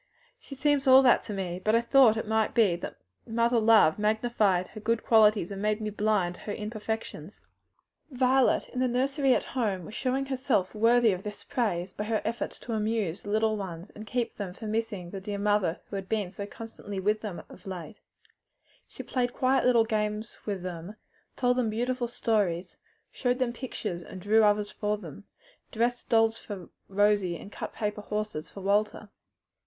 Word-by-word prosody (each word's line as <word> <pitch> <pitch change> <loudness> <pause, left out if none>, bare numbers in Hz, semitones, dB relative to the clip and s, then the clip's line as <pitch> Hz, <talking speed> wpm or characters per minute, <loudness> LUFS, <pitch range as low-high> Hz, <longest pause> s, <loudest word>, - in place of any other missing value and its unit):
"She 275 - -10
seems 290 0 +1
all 260 +1 +8
that 245 - +5
to 210 - -5
me; 185 -2 -4
but 215 +1 +3
I 230 - +4
thought 235 -2 +5
it 220 - -2
might 220 0 +1
be 210 -7 +4
that 170 - -7 0.3
mother 235 +1 +2
love 215 -6 +5
magnified 210 -4 +1
her - - -9
good 225 +2 0
qualities 215 -4 +4
and 195 0 -5
made 215 +1 +1
me 215 -1 -3
blind 205 -4 +1
to - - -15
her 205 - -4
imperfections." 215 -5 -5 0.7
Violet, 260 -1 +2
in 250 - -5
the 255 - +2
nursery 270 +2 +2
at - - 0
home, 205 -9 -1
was 210 - -10
showing 265 +3 -1
herself 260 -8 0
worthy 230 +1 +4
of 185 -1 -3
these 210 +1 -8
encomiums 185 -7 -1
by 210 - -4
her 220 0 0
efforts 235 - -3
to 235 - -5
amuse 215 -5 -1
the 205 - -8
little 220 +1 +2
ones 180 -3 -6
and 215 +1 -10
keep 245 0 -1
them 190 -3 -6
from 215 -1 -6
missing 210 -6 -3
the 195 - -6
dear 205 +1 -4
mother 200 -4 +1
who - - -4
had 195 -1 -5
been 210 -5 -1
so 200 +1 -6
constantly 205 -3 -7
with 210 +3 +1
them 205 -6 -6
of - - -14
late. 185 +2 -7 0.9
She - - -9
played 245 -2 -1
quiet 260 +1 +2
little 235 -3 +5
games 215 0 -2
with 195 -3 -3
them, 180 +2 -6 0.4
told 250 -1 +2
them 240 -3 +1
beautiful 245 +3 -1
stories, 195 -7 -1 0.4
showed 245 -1 0
them 255 -2 0
pictures 220 -8 -5
and 185 - -9
drew 215 +4 +4
others 210 0 +2
for 210 -1 -1
them, 195 0 -11 0.5
dressed 240 +2 -1
dolls 225 0 +3
for 195 -5 -8 0.2
Rosie 200 -3 +2
and 200 - -11
cut - - -6
paper 210 -1 -3
horses 210 -6 -4
for 200 - -10
Walter. 205 +2 0
215 Hz, 190 wpm, -28 LUFS, 200-235 Hz, 0.9 s, all